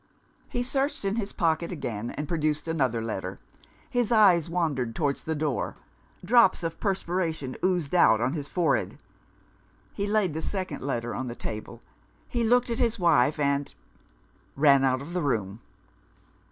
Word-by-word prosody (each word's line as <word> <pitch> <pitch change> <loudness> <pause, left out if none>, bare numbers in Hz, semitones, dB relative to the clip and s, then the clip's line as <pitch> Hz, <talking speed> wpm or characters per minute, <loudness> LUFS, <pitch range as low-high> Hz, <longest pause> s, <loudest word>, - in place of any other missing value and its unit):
He 245 - -2
searched 270 -2 -1
in 195 +3 0
his 205 -3 -2
pocket 165 0 0
again, 120 -9 -4
and 150 +1 -5
produced 155 -1 -1
another 130 -8 0
letter. 95 -4 -4 0.5
His 245 -2 0
eyes 185 -8 +5
wandered 145 -9 -1
towards 145 -3 -1
the 160 - -2
door; 150 -3 -2 0.5
drops 225 -4 +5
of 165 0 -4
perspiration 170 -8 -2
oozed 180 -5 0
out 110 -11 +5
on 125 +4 0
his 145 -3 -4
forehead. 175 0 0 1.0
He 200 0 -2
laid 205 -5 +1
the 160 - -3
second 190 0 -3
letter 120 -3 -2
on 130 - -4
the 120 - -5
table; 115 +2 -7 0.4
he 240 -1 -1
looked 245 +1 +3
at 230 - -2
his 235 -2 +1
wife, 155 -6 +3
and 140 -1 0 0.8
ran 140 -1 +5
out 130 0 +1
of 165 +5 -9
the 180 - 0
room. 110 - -2
160 Hz, 155 wpm, -27 LUFS, 130-190 Hz, 1.0 s, eyes